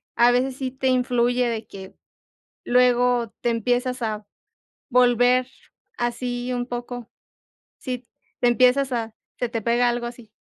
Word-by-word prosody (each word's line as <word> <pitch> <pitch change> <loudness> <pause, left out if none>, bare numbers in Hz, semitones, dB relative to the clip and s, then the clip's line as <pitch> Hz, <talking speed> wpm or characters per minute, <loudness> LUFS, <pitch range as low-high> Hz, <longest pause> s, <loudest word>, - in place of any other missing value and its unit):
a 240 +1 +5
veces 255 +1 0
sí 260 -2 -3
te 265 0 -2
influye 245 -1 +2
de 225 -2 -3
que 190 -1 -11 0.7
luego 245 -2 +3
te 240 - +1
empiezas 245 +2 0
a 215 -2 -3 0.6
volver 245 0 +4 0.5
así 245 +1 -2
un 245 0 -2
poco. 245 -1 -6 0.7
Sí, 250 -2 -6 0.3
te 245 - +3
empiezas 255 +3 +3
a 225 -2 -3 0.2
se 245 - -2
te 230 -2 -3
pega 240 +2 +2
algo 240 0 -2
así. 240 -2 -9
245 Hz, 140 wpm, -23 LUFS, 235-250 Hz, 0.7 s, a